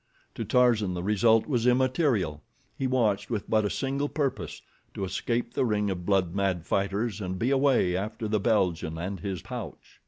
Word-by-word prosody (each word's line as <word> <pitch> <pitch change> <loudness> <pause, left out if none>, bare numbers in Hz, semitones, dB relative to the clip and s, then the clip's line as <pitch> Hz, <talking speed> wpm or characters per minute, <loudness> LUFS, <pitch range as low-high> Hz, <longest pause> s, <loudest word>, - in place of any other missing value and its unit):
To - - -4
Tarzan 115 -7 +3
the 90 - -4
result 110 +3 +3
was 125 -5 0
immaterial. 125 - +2 0.3
He 135 - -1
watched 115 -6 +1
with 110 -4 -3
but 110 -1 +2
a - - +1
single 140 +4 -1
purpose—to 105 - -4
escape 115 +5 -2
the - - +1
ring 105 -4 +1
of 90 -2 -5
blood 95 -4 +2
mad 95 -4 0
fighters 100 +2 -1
and 95 -1 -3
be 120 +7 0
away 135 -10 +3
after 105 +3 -3
the 105 0 +1
Belgian 90 -7 +1
and 95 +3 -4
his 95 0 -4
pouch. - - -8
105 Hz, 175 wpm, -27 LUFS, 95-120 Hz, 0.3 s, Tarzan